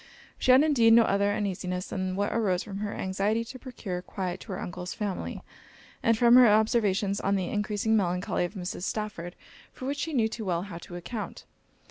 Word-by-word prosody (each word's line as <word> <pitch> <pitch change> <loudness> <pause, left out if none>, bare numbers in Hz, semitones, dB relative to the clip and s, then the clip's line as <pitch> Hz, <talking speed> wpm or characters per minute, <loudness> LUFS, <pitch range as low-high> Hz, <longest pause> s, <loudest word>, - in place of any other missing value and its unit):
She - - -1
had 260 +3 +7
indeed 240 -7 +5
no 230 0 +8
other 200 -1 +2
uneasiness 185 -3 -2
than 185 -1 -2
what 205 +1 -1
arose 190 -6 +1
from 195 -1 -7
her 205 0 -3
anxiety 200 +4 -1
to 255 +2 -9
procure 210 -9 -5
quiet 185 -1 -4
to 205 - -9
her 185 - -4
Uncle's 180 +1 -6
family, 205 -4 -4 0.6
and 230 -2 +3
from 235 +1 +5
her 250 -1 +8
observations 210 -2 +2
on 200 +1 +1
the 185 -2 -1
encreasing 210 +1 0
melancholy 180 -3 0
of 175 - -8
Mrs. 180 -2 -5
Stafford, 190 -3 -4 0.4
for 255 - -9
which 285 +2 -2
she 320 +1 -3
knew 230 -5 +3
too 220 0 -6
well 175 -2 0
how 180 -4 -8
to 175 - -10
account. 210 +5 -6
205 Hz, 195 wpm, -28 LUFS, 185-225 Hz, 0.6 s, no